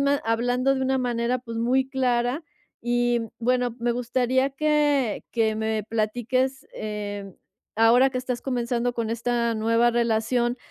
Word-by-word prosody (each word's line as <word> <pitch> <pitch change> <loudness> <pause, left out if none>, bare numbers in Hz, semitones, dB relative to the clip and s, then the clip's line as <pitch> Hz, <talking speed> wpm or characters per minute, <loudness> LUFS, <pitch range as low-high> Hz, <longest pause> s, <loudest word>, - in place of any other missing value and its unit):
ma 280 0 +3
hablando 245 +4 +1
de 265 - -2
una 265 0 +1
manera, 245 0 0
pues 230 -2 -7
muy 260 +3 +2
clara 255 +2 0 0.4
y 240 0 +1 0.2
bueno, 245 0 0
me 240 0 0
gustaría 250 +2 0
que 290 -4 +1
que 220 -2 +1
me 220 -1 -1
platiques, 245 +5 -1
eh, 205 -2 -5 0.4
ahora 240 +4 +5
que 255 - -2
estás 250 -1 -3
comenzando 245 -1 -1
con 230 -2 -2
esta 235 0 0
nueva 230 +2 +2
relación, 235 +1 +1
240 Hz, 140 wpm, -25 LUFS, 230-255 Hz, 0.4 s, ahora